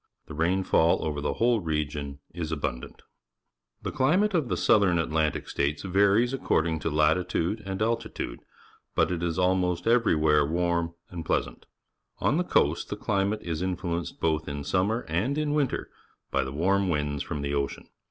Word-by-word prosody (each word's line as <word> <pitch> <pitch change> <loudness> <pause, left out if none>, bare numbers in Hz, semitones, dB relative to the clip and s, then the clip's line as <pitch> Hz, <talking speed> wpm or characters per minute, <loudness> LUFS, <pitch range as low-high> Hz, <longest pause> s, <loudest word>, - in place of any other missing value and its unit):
The - - -10
rainfall 85 +1 +2
over 75 -2 -2
the 75 - -1
whole 115 0 +3
region 75 -4 -3
is 80 -2 -4
abundant. 70 -5 -4 0.8
T - - -3
hejclimate 185 +11 +2
of 155 -9 +1
the - - 0
South 105 - +4
Atlantic 80 -4 +1
States 75 +1 -1
varies 100 +6 +3
according 80 -11 0
to 80 - -2
latitude 85 +6 +1
and 95 0 -3
altitude, 115 +1 -2 0.6
but - - +2
it 85 -2 -2
is 85 -1 -1
almost 90 -1 +1
e^"ervwlK'^e 80 -9 +3
\\arm 85 -1 -1 0.2
and 85 -2 -5
pleasant. - - -2 0.5
Onthe 175 +5 +1
coast 75 +3 +2
the - - -2
climate 105 0 0
is 85 -1 -3
influenced 90 -3 -3
both 80 -1 0
in 70 0 -4
summer 95 - 0
and 100 - 0
in 150 -1 0
winter 145 -4 -1 0.4
by 65 - +1
the 65 - -5
warm 95 +6 +1
winds 75 -3 -1
from 70 0 -4
the 70 0 -2
ocean. 70 -1 -2
85 Hz, 160 wpm, -27 LUFS, 75-100 Hz, 0.8 s, South